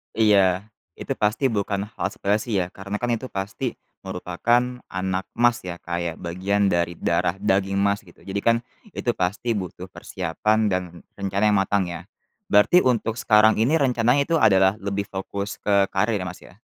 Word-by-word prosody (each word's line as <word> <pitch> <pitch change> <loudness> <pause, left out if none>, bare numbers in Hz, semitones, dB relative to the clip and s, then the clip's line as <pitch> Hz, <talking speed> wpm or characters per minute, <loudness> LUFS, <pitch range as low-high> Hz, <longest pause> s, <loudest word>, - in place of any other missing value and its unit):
Iya. 100 -4 +4 0.3
Itu - - -3
pasti 105 +6 +1
bukan 100 -1 -1
hal - - -2
sepele 100 +1 0
sih 110 -4 -2
ya, 90 -1 -2
karena 100 +2 -5
kan 120 +1 -2
itu 115 +3 -3
pasti 95 0 -4 0.3
merupakan 120 +7 -1
anak 95 0 -2
Mas 120 0 +3
ya, 90 -1 -6
kayak 85 -1 -4
bagian 95 +4 -1
dari 85 -1 0
darah 90 +2 0
daging 95 0 +1
Mas 100 +1 +1
gitu, - - -19
jadi 100 +1 -3
kan 115 +2 +4 0.4
itu 120 - 0
pasti 105 +6 -1
butuh 95 -3 -5
persiapan 95 +5 -1
dan 90 0 0 0.3
rencana 100 +1 -2
yang 100 - +4
matang 100 0 +1
ya. 85 -1 -6 0.5
Berarti 105 - +5
untuk 115 -3 +1
sekarang 110 -3 +4
ini 135 +8 +3
rencananya 125 -1 +2
itu 165 +1 +1
adalah 95 -1 +5
lebih 100 0 -2
fokus 100 +1 -5
ke 100 -1 +3
karir 110 0 +1
ya 90 - -4
Mas 90 0 -8
ya? 90 - -16
100 Hz, 170 wpm, -23 LUFS, 95-110 Hz, 0.5 s, Berarti